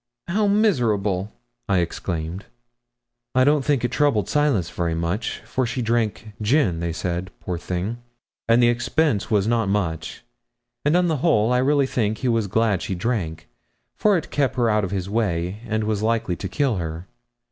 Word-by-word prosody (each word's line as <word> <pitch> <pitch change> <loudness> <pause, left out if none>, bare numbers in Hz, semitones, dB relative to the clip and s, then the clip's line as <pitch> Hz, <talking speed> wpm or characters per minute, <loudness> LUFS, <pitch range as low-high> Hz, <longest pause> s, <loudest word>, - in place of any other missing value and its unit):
'How 205 +4 +1
miserable!' 110 - +1 0.4
I 100 - +3
exclaimed. 85 +1 -3 0.9
'I 130 - +5
don't 145 +1 +3
think 140 -4 +1
it - - -2
troubled 140 - +2
Silas 135 - +1
very 85 +1 -1
much, 85 +7 -2
for 130 - -1
she 125 +1 -2
drank 110 -1 -1
gin, 105 - +2
they 85 0 -2
said, 90 +2 -3
poor 90 -2 -4
thing, 95 +8 -3 0.5
and 120 +1 +5
the - - +6
expense 120 0 +1
was 105 -3 +2
not 115 -3 +1
much; 85 -5 -2 0.6
and, 150 +4 +3
on 180 - +3
the 160 -3 +1
whole, 125 -6 +3
I 125 - +3
really 140 +2 +3
think 110 -4 -1
he 130 - -2
was 115 -3 +1
glad 105 -2 +1
she 95 - -3
drank, 90 -6 -2 0.5
for 210 -3 +3
it 165 - -5
kept 140 -3 +1
her 120 -3 +2
out 105 0 +2
of 95 - -2
his 95 -1 -3
way, 100 -3 -1
and 110 0 0
was 105 -1 -1
likely 110 -5 0
to 95 - -5
kill 135 0 0
her. 80 0 -5
110 Hz, 180 wpm, -23 LUFS, 90-130 Hz, 0.9 s, the